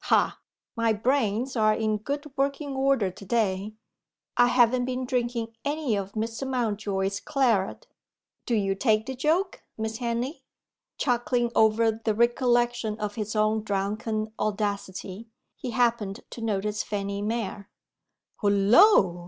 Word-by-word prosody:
Ha! - - +2 0.4
my 230 -1 +2
brains 240 +1 0
are 215 -2 +3
in 215 -1 0
good 285 +7 -4
working 280 +1 -1
order 265 -7 +2
to 185 - -13
day; 205 -1 -1 0.6
I 245 0 +5
haven't 245 0 +3
been 255 0 -2
drinking 240 -2 -2
any 290 -5 0
of 200 0 -4
Mr. 225 +4 -3
Mountjoy's 205 -5 -1
claret 245 -10 0 0.6
do 235 - +1
you 195 -2 +1
take 215 +1 +1
the 265 - -4
joke, 360 - 0 0.2
Miss 220 0 -3
Henley?" 240 +5 -2 0.6
Chuckling 240 -1 +1
over 220 +1 +4
the 220 -2 +1
recollection 240 -1 +1
of 210 -1 -3
his 215 0 -4
own 215 +1 +2
drunken 215 +2 -2
audacity, 200 0 -3 0.3
he 255 - -6
happened 230 -4 0
to 235 - -8
notice 210 -1 -1
Fanny 200 -1 -3
Mere. 210 -2 -3 0.7
"Hullo! 200 - +5
225 Hz, 130 wpm, -26 LUFS, 205-245 Hz, 0.7 s, I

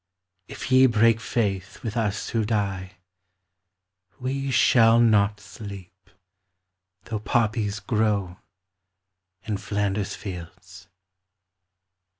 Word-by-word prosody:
If - - -7
ye 130 0 +7
break 115 -1 +3
faith 100 -2 -2
with 110 -4 -4
us 105 -3 -1
who 115 -1 0
die 100 -3 -2 1.3
We 135 +2 -2
shall 115 -2 +5
not 105 -3 +3
sleep, 100 -2 -11 0.9
though 110 -1 -4
poppies 110 -2 0
grow 105 -6 -1 1.0
In 105 -2 -2
Flanders 100 0 -2
fields. 90 0 -9
105 Hz, 90 wpm, -25 LUFS, 100-115 Hz, 1.3 s, ye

